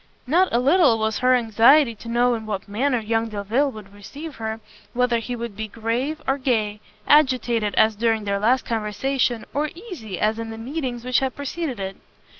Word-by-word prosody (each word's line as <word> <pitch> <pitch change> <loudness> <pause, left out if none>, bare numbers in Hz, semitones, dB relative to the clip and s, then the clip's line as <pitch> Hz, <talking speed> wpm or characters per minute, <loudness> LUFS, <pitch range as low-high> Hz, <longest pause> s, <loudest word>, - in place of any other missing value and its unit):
Not 350 +8 +3
a - - +2
little 275 -1 +4
was 220 0 -1
her 255 0 +4
anxiety 235 +3 +5
to 230 +2 -11
know 240 +1 +2
in 220 -2 -5
what 205 -2 -4
manner 250 +6 0
young 225 0 -1
Delvile 220 +7 0
would 210 -3 -12
receive 275 +10 -9
her, 220 0 -4 0.3
whether 245 -1 +2
he 245 +2 -5
would 235 -3 -6
be 220 +1 -4
grave 230 +8 -3
or 270 +1 +1
gay, 215 -5 0 0.3
agitated, 250 -7 +3
as 220 0 +4
during 225 0 +1
their 200 -1 -1
last 245 +5 +2
conversation, 230 +2 -1
or 300 +2 0
easy, 335 - -8
as 215 +1 +1
in 225 0 -5
the 225 - -7
meetings 250 -1 -4
which 255 -1 +2
had 265 -1 -2
preceded 285 -3 -4
it. 195 0 -5
235 Hz, 190 wpm, -23 LUFS, 220-265 Hz, 0.3 s, anxiety